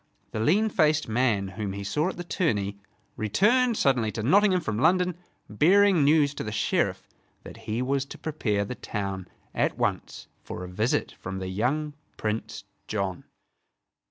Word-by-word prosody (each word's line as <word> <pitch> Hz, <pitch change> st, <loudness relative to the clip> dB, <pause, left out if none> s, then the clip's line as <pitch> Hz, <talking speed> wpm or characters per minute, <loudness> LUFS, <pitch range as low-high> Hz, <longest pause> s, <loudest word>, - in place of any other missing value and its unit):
The -, -, -3 dB
lean 195 Hz, -, +3 dB
faced 155 Hz, -5 st, +2 dB
man 110 Hz, -4 st, +1 dB
whom 100 Hz, 0 st, -4 dB
he 100 Hz, 0 st, -5 dB
saw 150 Hz, -, 0 dB
at -, -, -7 dB
the 175 Hz, -, -4 dB
tourney 105 Hz, -, -1 dB, 0.4 s
returned 220 Hz, -, +2 dB
suddenly 125 Hz, -6 st, +2 dB
to 110 Hz, -, -4 dB
Nottingham 185 Hz, -, +4 dB
from 110 Hz, -7 st, -3 dB
London, 180 Hz, +4 st, +3 dB, 0.3 s
bearing 180 Hz, -, +4 dB
news 145 Hz, 0 st, +4 dB
to -, -, -5 dB
the 105 Hz, -, -4 dB
Sheriff 105 Hz, -, 0 dB, 0.4 s
that -, -, -10 dB
he 115 Hz, +4 st, 0 dB
was 135 Hz, +1 st, 0 dB
to -, -, -10 dB
prepare 105 Hz, -10 st, -1 dB
the 115 Hz, -, -5 dB
town 95 Hz, -5 st, -4 dB, 0.3 s
at -, -, 0 dB
once -, -, -2 dB
for -, -, -7 dB
a -, -, -6 dB
visit 105 Hz, +7 st, 0 dB
from 95 Hz, +1 st, -7 dB
the 95 Hz, -1 st, -4 dB
young 135 Hz, +10 st, -1 dB, 0.2 s
Prince 110 Hz, +1 st, -3 dB, 0.2 s
John. 100 Hz, -4 st, -3 dB
125 Hz, 160 wpm, -26 LUFS, 105-160 Hz, 0.4 s, Nottingham